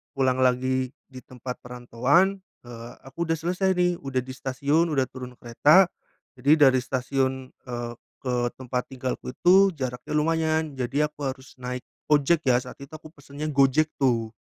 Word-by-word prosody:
pulang 130 -1 +1
lagi 130 0 +1 0.2
di 130 - -9
tempat 125 0 -8
perantauan, 125 +10 +1 0.2
eee, 120 -1 -10
aku 140 +6 -5
udah 165 - +1
selesai 180 +4 0
nih, 180 -1 +1
udah 130 -2 -2
di 130 - -9
stasiun 140 +5 0
udah 140 -4 +2
turun 125 -1 -9
kereta, 150 +11 +4 0.5
jadi 145 +2 +5
dari 130 0 +2
stasiun, 130 +1 -2
eee, 120 -2 -6 0.3
ke 125 -2 -1 0.2
tempat 125 -1 -4
tinggalku 130 -1 -5
itu 190 +1 +5
jaraknya 130 0 -4
lumayan, 160 -2 0
jadi 145 +5 0
aku 145 -2 -5
harus 130 0 -8
naik 125 0 -5 0.2
ojek 150 +1 +2
ya, 125 - +5
saat 125 - -11
itu 140 +3 -10
aku 155 0 -12
pesennya 145 0 -7
Gojek 140 +2 +3
tuh. 115 -5 +1
135 Hz, 160 wpm, -25 LUFS, 125-155 Hz, 0.5 s, jadi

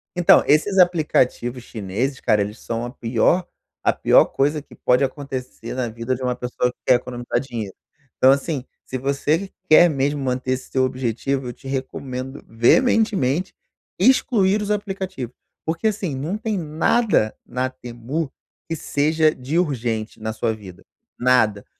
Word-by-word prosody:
Então, 175 -1 +6
esses 190 +7 +3
aplicativos 150 -8 +2
chineses 115 +5 -3
cara, 105 -1 +2
eles 105 +2 -4
são 115 +1 -3
a - - -5
pior 125 +9 +1 0.4
a - - +4
pior - - +5
coisa 145 +2 0
que - - -17
pode 125 +2 +2
acontecer 135 -2 -5
na 125 -2 -2
vida 115 +3 -3
de 130 - -10
uma 125 -1 0
pessoa 125 0 -1
que - - -33
quer 125 - +6
economizar 120 0 -2
dinheiro. 115 -7 -5 0.4
Então 130 - +6
assim, 140 0 0 0.2
se 130 - -4
você 145 +8 0 0.2
quer 175 +3 +8
mesmo 145 0 0
manter 130 0 -1
esse 130 0 -3
seu 130 - +1
objetivo, 130 +1 -1
eu 120 - -5
te 135 - -13
recomendo 135 0 -5
veementemente 185 - +2 0.4
excluir 210 -6 +3
os 210 - -3
aplicativos, 190 - -3 0.3
porque 165 +6 0
assim, 195 -7 -2
não 155 +10 -3
tem 220 -2 -2
nada 160 - +1
na 130 +1 -2
Temu, 130 +4 -5 0.4
que 165 - -1
seja 155 +1 +1
de 135 +6 -3
urgente 120 -9 -1
na 110 0 -3
sua 110 +1 -1
vida, 95 -5 -12 0.4
nada. 110 -5 +3
130 Hz, 155 wpm, -22 LUFS, 120-160 Hz, 0.4 s, quer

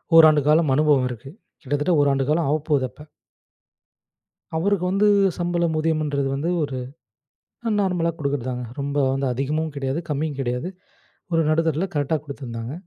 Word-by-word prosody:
1 165 -1 +10
ஆண்டு 150 -1 +3
காலம் 155 -2 +4
அனுபவம் 145 -4 +3
இருக்கு 125 +3 -8 0.3
கிட்டத்தட்ட 145 +5 0
1ஆண்டு 135 -1 +2
காலம் 155 -1 +2
ஆவப்போகுது 150 -3 +1
அப்ப. 150 - -17 1.6
அவருக்கு 185 +2 +1
வந்து 200 +2 +2 0.3
சம்பளம் 175 -2 0
ஊதியம்ன்றது 155 -3 0
வந்து 155 +6 -1
ஒரு 140 -3 -3 1.0
நார்மலா 180 -4 +1
குடுக்கறது 140 -4 -2
தாங்க. 125 -1 -4
ரொம்ப 140 +1 -3 0.2
வந்து 135 0 -1
அதிகமும் 150 +4 -2
கிடையாது, 135 +3 -2
கம்மியும் 145 -1 -2
கிடையாது. 125 +6 -2 0.6
ஒரு 165 - +3
நடுத்தரதுல 165 +3 +1
கரெக்ட்டா 145 +2 +1
குடுத்துருந்தாங்க. 120 -3 -6
150 Hz, 135 wpm, -23 LUFS, 135-165 Hz, 1.6 s, 1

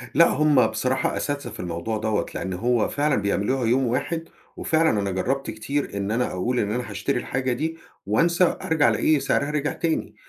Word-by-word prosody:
لأ، 170 - +7
هُم 150 -2 +4
بصراحة 130 +4 -1
أساتذة 145 -1 -3
في - - -11
الموضوع 90 +5 -3
دوّة، 110 -1 0
لإن 95 -1 -3
هو 120 +4 +1
فعلًا 145 0 +1
بيعملوها 105 +5 0
يوم 125 +2 +2
واحد، 160 +7 -2 0.3
وفعلًا 160 0 +2
أنا 100 -1 -1
جرَّبت 135 +9 -1
كتير 110 +1 -3
إن 100 +1 -2
أنا 125 +2 +1
أقول 120 +7 -1
إن 105 0 0
أنا 125 -1 -3
هاشتري 115 +6 -1
الحاجة 130 0 -1
دي، 160 +5 -3 0.3
وأنسى، 170 - +2
أرجَع 160 -2 +3
ألاقي 155 -2 +2
سعرها 140 +1 0
رجع 150 -1 -1
تاني. 165 -1 -2
130 Hz, 180 wpm, -24 LUFS, 110-150 Hz, 0.3 s, لأ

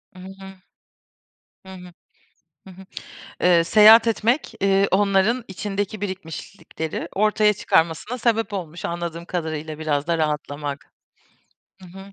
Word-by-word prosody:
Hı - - -13
hı. 195 +1 -11 1.1
Hı 190 - -10
hı. 180 -1 -12 0.7
Hı - - -11
hı. 190 +1 -14 0.5
Eee, 170 -2 +4
seyahat 220 +5 +7
etmek, 230 +5 0
eee, 195 0 +2
onların 205 +5 +2
içindeki 200 +1 -4
birikmişlikleri 180 -3 -6
ortaya 210 +1 +3
çıkarmasına 170 +5 0
sebep 225 -3 0
olmuş, 175 -4 -6
anladığım 170 0 -4
kadarıyla, 160 -3 -5
biraz 150 -1 -1
da 170 -1 0
rahatlamak. 150 -2 -4 0.9
Hı - - -11
hı. 195 +2 -12
190 Hz, 120 wpm, -22 LUFS, 165-205 Hz, 1.1 s, seyahat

